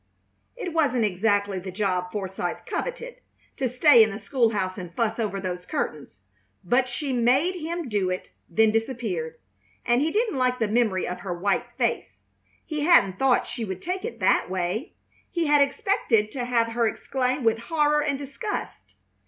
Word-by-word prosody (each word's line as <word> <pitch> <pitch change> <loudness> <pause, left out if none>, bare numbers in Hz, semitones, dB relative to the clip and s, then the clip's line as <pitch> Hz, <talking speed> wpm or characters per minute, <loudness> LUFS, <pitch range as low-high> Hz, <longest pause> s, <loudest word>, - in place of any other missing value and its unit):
It 370 -9 -5
wasn't 275 -8 +2
exactly 205 0 +1
the 190 +1 -7
job 180 -2 -1
Forsythe 190 -3 -4
coveted, - - -4 0.4
to 260 -2 -1
stay 255 0 +6
in 220 - +5
the 200 - -5
school 230 +3 +1
house 190 -2 -2
and 180 -2 -7
fuss 225 0 0
over 205 -3 -1
those 180 -2 -4
curtains; 140 -11 -4 0.4
but 245 +8 +2
she 260 +2 -3
made 255 +9 +3
him 335 0 -4
do 205 -5 0
it, 185 0 -4 0.2
then 220 +5 +4
disappeared, 225 -8 -2 0.5
and 240 +2 +3
he 310 - +2
didn't 425 - 0
like 250 0 +2
the 225 -3 0
memory 215 -4 +1
of 180 - -4
her 175 -3 -4
white 205 +7 0
face. - - -2 0.4
He 305 -2 -4
hadn't 200 - +4
thought 270 -2 +3
she 235 - -5
would 190 -4 -4
take 365 +2 -3
it 230 - -5
that 185 - +3
way. 185 - -3 0.3
He 340 -2 -1
had 295 -1 +4
expected 280 - +1
to 250 -3 -3
have 235 -2 +1
her 230 0 +1
exclaim 255 +3 -1
with 225 -1 +2
horror 300 -2 +3
and 280 -2 0
disgust. 285 - -6
230 Hz, 175 wpm, -25 LUFS, 195-280 Hz, 0.5 s, stay